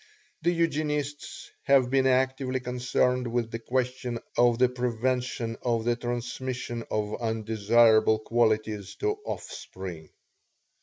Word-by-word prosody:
The 170 Hz, -, +2 dB
Eugenists 150 Hz, -3 st, -2 dB
have 135 Hz, -3 st, +4 dB
been 135 Hz, -1 st, +3 dB
actively 130 Hz, 0 st, +1 dB
concerned 125 Hz, 0 st, 0 dB
with 115 Hz, -1 st, -1 dB
the 115 Hz, -, -4 dB
question 125 Hz, 0 st, -2 dB, 0.2 s
of 120 Hz, -1 st, +4 dB
the 125 Hz, +1 st, +5 dB
prevention 125 Hz, -1 st, -2 dB
of 115 Hz, -2 st, 0 dB
the 120 Hz, 0 st, +2 dB
transmission 120 Hz, 0 st, -4 dB
of 105 Hz, +1 st, -2 dB
undesirable 110 Hz, 0 st, +3 dB
qualities 110 Hz, -3 st, 0 dB
to 420 Hz, 0 st, -1 dB
offspring. 90 Hz, -, -7 dB
120 Hz, 110 wpm, -27 LUFS, 115-130 Hz, 0.2 s, the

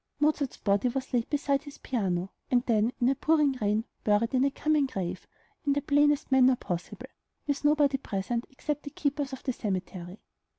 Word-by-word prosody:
Mozart's 295 Hz, -2 st, +1 dB
body 200 Hz, +4 st, +1 dB
was 260 Hz, +1 st, -4 dB
laid 235 Hz, -2 st, +1 dB
beside 280 Hz, -2 st, +1 dB
his 285 Hz, -1 st, -11 dB
piano, 190 Hz, -6 st, -2 dB, 0.2 s
and 245 Hz, -1 st, +3 dB
then, 225 Hz, 0 st, +2 dB
in 240 Hz, -, +3 dB
a 270 Hz, -, +4 dB
pouring 300 Hz, +1 st, +3 dB
rain, 210 Hz, +2 st, +1 dB, 0.2 s
buried 210 Hz, +3 st, +2 dB
in 255 Hz, 0 st, +3 dB
a 280 Hz, -, +4 dB
"common 300 Hz, 0 st, +1 dB
grave," 185 Hz, -6 st, -4 dB, 0.4 s
in 285 Hz, -, +2 dB
the 285 Hz, -, 0 dB
plainest 290 Hz, -1 st, +3 dB
manner 260 Hz, -1 st, +6 dB
possible, 175 Hz, -7 st, -5 dB, 0.4 s
with 285 Hz, -1 st, -1 dB
nobody 295 Hz, -2 st, +4 dB
present 230 Hz, +5 st, -3 dB
except 295 Hz, +2 st, -3 dB
the 285 Hz, -, -7 dB
keepers 285 Hz, 0 st, -2 dB
of 265 Hz, -, -7 dB
the 260 Hz, -, -1 dB
cemetery. 185 Hz, -3 st, -4 dB
260 Hz, 180 wpm, -28 LUFS, 210-285 Hz, 0.4 s, manner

